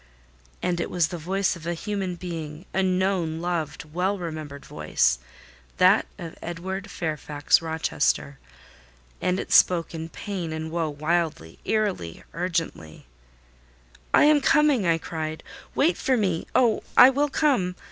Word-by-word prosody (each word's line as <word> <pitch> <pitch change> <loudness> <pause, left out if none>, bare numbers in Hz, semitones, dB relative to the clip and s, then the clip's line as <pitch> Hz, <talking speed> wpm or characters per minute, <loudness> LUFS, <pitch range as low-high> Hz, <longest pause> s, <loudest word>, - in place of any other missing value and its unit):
And 175 -1 0
it - - -2
was 170 -3 +1
the 175 - -5
voice 190 +5 0
of 170 -1 -9
a 170 - -1
human 195 -1 -3
being—a 170 +1 -5
known, 185 -3 0
loved, 170 -3 -3
well 190 +4 0
remembered 155 -5 -6
voice—that - - 0
of 165 -2 -8
Edward 190 +4 -5
Fairfax 150 -4 0
Rochester; 160 -3 -1 0.8
and 185 +1 +1
it - - -6
spoke 175 -2 +4
in 165 0 -5
pain 180 -2 -5
and 160 0 -5
woe, 165 -2 -1
wildly, 150 - -2
eerily, 205 - -1
urgently. 165 - -3 1.1
"I - - +6
am 300 -1 +5
coming!" 275 -8 +3
I 165 -1 +3
cried. 160 -1 -5 0.3
"Wait 325 +5 +3
for 260 -1 +1
me! 185 -7 0
Oh, 240 -4 +4 0.2
I 250 +2 +10
will 290 +2 +1
come!" 255 - +1
170 Hz, 135 wpm, -25 LUFS, 160-190 Hz, 1.1 s, I